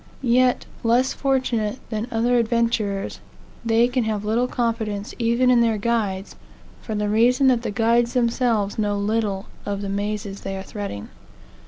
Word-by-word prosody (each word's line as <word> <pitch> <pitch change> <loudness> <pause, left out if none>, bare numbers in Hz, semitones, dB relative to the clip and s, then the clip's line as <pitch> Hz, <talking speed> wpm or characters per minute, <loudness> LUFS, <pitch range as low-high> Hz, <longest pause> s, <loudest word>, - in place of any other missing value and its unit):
Yet, 250 0 +3 0.2
less 240 +3 +3
fortunate 255 -5 0
than 215 +1 -2
other 240 +2 +2
adventurers, 230 -4 0 0.4
they 230 +1 +3
can 250 0 0
have 210 -1 -2
little 230 +4 +1
confidence 225 -4 -2
even 235 +2 +3
in 240 -1 +5
their 225 -2 +2
guides, 205 -3 -1 0.5
for 220 - -5
the 210 0 -1
reason 240 +5 +3
that 245 -2 +2
the - - -3
guides 235 +3 +2
themselves 235 -4 +1
know 205 -1 0
little 205 -1 -1 0.2
of 205 0 -3
the 200 - -3
mazes 200 0 -3
they 195 0 -4
are 190 - -6
threading. 200 - -6
225 Hz, 155 wpm, -23 LUFS, 205-240 Hz, 0.5 s, in